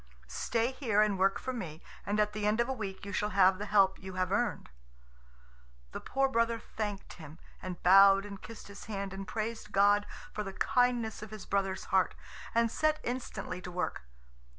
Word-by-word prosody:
Stay 230 - -1
here 245 -6 0
and 205 -3 0
work 195 +1 +3
for 260 - -4
me, 165 -10 -6 0.3
and 205 +1 0
at 210 0 +2
the 210 -1 -1
end 215 +2 +2
of 235 - +2
a 265 - -1
week 195 -6 -6
you 200 - -6
shall 210 +2 0
have 190 -1 +4
the 210 - -4
help 195 -2 +4
you 190 0 -8
have 185 0 -1
earned." 210 - -1 1.2
The - - -5
poor 270 0 +1
brother 230 -2 +1
thanked 210 -3 -5
him, 155 0 -11 0.2
and 180 -2 -7
bowed 195 +2 +7
and 200 -2 -9
kissed 225 -1 -10
his 200 0 -10
hand, 200 -2 -4
and 195 0 -6
praised 220 -1 -4
God 205 +1 +4 0.3
for 210 - -3
the 195 -1 -6
kindness 240 -1 +1
of 215 - -7
his 215 -1 -9
brother's 195 -1 -1
heart, 190 -1 +3 0.4
and 230 -1 +3
set 310 +3 +1
instantly 240 -7 -4
to 180 - -7
work. 180 0 -3
205 Hz, 195 wpm, -31 LUFS, 195-230 Hz, 1.2 s, bowed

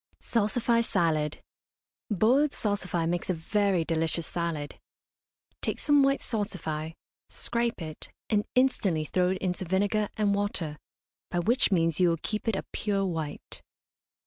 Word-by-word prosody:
SALSIFY 230 +1 +2
SALAD. 160 -9 0 0.7
Boiled 250 +8 +3
salsify 185 -5 -1
makes 175 +2 -2
a 185 - +2
very 190 +1 +1
delicious 165 0 0
salad. 165 -4 -3 0.8
Take - - -2
some 290 -2 +4
white 275 0 +3
salsify, 165 -8 -2 0.4
scrape 235 0 -1
it, 155 -1 -8 0.2
and 210 -2 +1
instantly 205 -11 +2
throw 180 +4 +1
it 190 - 0
into 185 +1 -2
vinegar 205 +4 +1
and 205 -2 +2
water, 185 -7 -2 0.5
by - - -2
which 220 +7 +3
means 165 -3 +2
you 180 -1 +5
will 165 - +1
keep 215 +1 -3
it 225 - +2
a - - -3
pure 200 -2 0
white. 160 -5 -5
190 Hz, 140 wpm, -28 LUFS, 165-215 Hz, 0.8 s, you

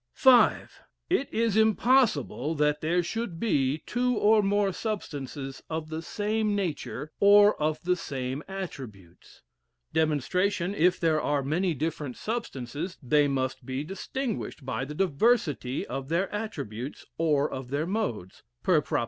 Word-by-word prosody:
V. 265 - +7 0.8
It 315 -7 +1
is 225 -2 +1
impossible 220 - +3
that 150 0 +1
there 175 +3 +1
should 200 -3 -4
be 145 -8 +1
two 250 0 0
or 215 +1 +5
more 200 -1 +1
substances 145 - -5
of 160 -1 -4
the 160 0 -4
same 210 +4 -1
nature, 155 -5 -3
or 205 +1 +7
of 155 +2 0
the 180 +1 +2
same 135 -4 -4
attributes. 130 - -9 0.5
Dem. 160 -1 +3
If 180 +2 +1
there 160 -2 +2
are 145 -1 0
many 165 +5 0
different 150 -3 -3
substances 170 - -4
they 145 +3 +3
must 130 -1 -2
be 130 +1 -3
distinguished 200 - -4
by 130 0 -2
the 150 +2 -7
diversity 155 - +1
of 135 0 -5
their 175 +5 0
attributes 140 - -5
or 150 -3 +2
of 130 -3 -7
their 145 +3 -1
modes 170 - -3 0.2
(per - - +4
prop. - - -1
160 Hz, 140 wpm, -28 LUFS, 140-205 Hz, 0.8 s, V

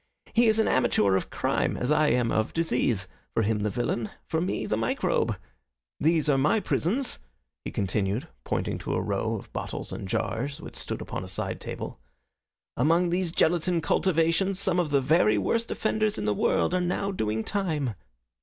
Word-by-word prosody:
He 235 0 +5
is 220 0 +4
an 220 - +3
amateur 105 -6 +3
of 95 - -1
crime, - - 0
as 125 - -1
I 150 0 +4
am 120 -3 +2
of 110 0 0
disease. 125 - 0 0.3
For 115 - +3
him 110 0 +1
the 105 +1 0
villain, 120 +1 -1 0.2
for 160 - -1
me 180 - -1
the - - 0
microbe. 115 +1 0 0.6
There 160 +1 +3
are 135 - +2
my 150 +11 +3
prisons," 225 - 0 0.4
he - - -4
continued, 100 +3 -1 0.2
pointing - - -2
to - - -2
a - - +1
row - - -1
of - - -9
bottles - - -4
and 95 - -5
jars 130 +8 -2
which - - -9
stood - - -4
upon - - -5
a - - -7
side 95 - -4
table. - - -6 0.8
"Among 165 +7 +3
those 180 -1 0
gelatine 175 +1 +2
cultivations 165 +4 +2
some 180 -2 +1
of 170 -4 +1
the 140 -1 +3
very 130 -6 +4
worst 230 - 0
offenders 215 -1 0
in 105 - -3
the 105 - +2
world 170 - +1
are 185 - +2
now 180 +3 -1
doing 110 - -1
time." 155 - -1
150 Hz, 180 wpm, -27 LUFS, 110-180 Hz, 0.8 s, He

